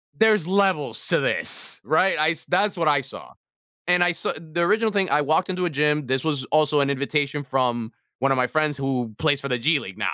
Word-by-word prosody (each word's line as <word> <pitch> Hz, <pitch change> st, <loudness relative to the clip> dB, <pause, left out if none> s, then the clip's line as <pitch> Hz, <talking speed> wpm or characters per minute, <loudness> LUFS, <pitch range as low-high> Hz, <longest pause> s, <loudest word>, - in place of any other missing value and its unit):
there's 215 Hz, -6 st, +3 dB
levels 185 Hz, -, 0 dB
to -, -, +2 dB
this, -, -, 0 dB
right? 160 Hz, -, +2 dB
I 155 Hz, +1 st, +3 dB
s 165 Hz, -1 st, -4 dB
that's 195 Hz, +2 st, 0 dB
what 165 Hz, -2 st, 0 dB
I 145 Hz, -2 st, +3 dB
saw, 135 Hz, -, -10 dB, 0.6 s
and 180 Hz, 0 st, +4 dB
I 175 Hz, -, +3 dB
sa 170 Hz, -, -3 dB
the 160 Hz, +1 st, -7 dB
original 215 Hz, +5 st, +2 dB
thing, 195 Hz, -2 st, 0 dB
I 150 Hz, -, +2 dB
walked 155 Hz, +6 st, 0 dB
into 180 Hz, -1 st, -2 dB
a -, -, 0 dB
gym, 150 Hz, -1 st, 0 dB
this 130 Hz, +2 st, -1 dB
was 145 Hz, -4 st, -1 dB
also 150 Hz, -1 st, +3 dB
an 140 Hz, -, 0 dB
invitation 140 Hz, +1 st, -1 dB
from 125 Hz, -4 st, -2 dB, 0.3 s
one 135 Hz, +2 st, +1 dB
of -, -, -2 dB
my 125 Hz, -, +2 dB
friends 155 Hz, 0 st, 0 dB
who 130 Hz, -5 st, -3 dB
plays 145 Hz, -3 st, +1 dB
for 140 Hz, -, -5 dB
the 125 Hz, -2 st, -1 dB
G 145 Hz, +5 st, +1 dB
League 95 Hz, -8 st, -10 dB
now. -, -, -2 dB
150 Hz, 230 wpm, -23 LUFS, 135-175 Hz, 0.6 s, and